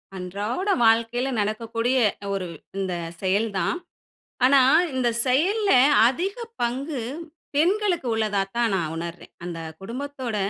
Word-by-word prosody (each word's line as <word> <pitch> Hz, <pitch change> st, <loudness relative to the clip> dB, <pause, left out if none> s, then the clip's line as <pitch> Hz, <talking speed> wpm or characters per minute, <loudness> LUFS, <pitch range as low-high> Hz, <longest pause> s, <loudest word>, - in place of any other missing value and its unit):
அன்றாட 205 Hz, -, -4 dB, 0.2 s
வாழ்க்கையில 230 Hz, +3 st, +2 dB
நடக்கக்கூடிய 230 Hz, +4 st, -1 dB, 0.4 s
ஒரு 190 Hz, -2 st, -3 dB, 0.3 s
இந்த 190 Hz, -2 st, -2 dB, 0.3 s
செயல் 200 Hz, +4 st, +1 dB
தான். 170 Hz, -, 0 dB, 0.7 s
ஆனா, 270 Hz, +1 st, +6 dB, 0.3 s
இந்த 255 Hz, -2 st, +1 dB, 0.2 s
செயல்ல 380 Hz, -, +2 dB, 0.4 s
அதிக 350 Hz, +11 st, -1 dB, 0.3 s
பங்கு 260 Hz, +3 st, -2 dB, 0.5 s
பெண்களுக்கு 355 Hz, -1 st, +2 dB
உள்ளதாத்தான் 215 Hz, +1 st, 0 dB
நான் 165 Hz, -4 st, -1 dB
உணர்றேன். 170 Hz, +1 st, -7 dB
அந்த 175 Hz, -1 st, -5 dB, 0.2 s
குடும்பத்தோட, 255 Hz, +2 st, -5 dB
235 Hz, 105 wpm, -24 LUFS, 195-275 Hz, 0.7 s, ஆனா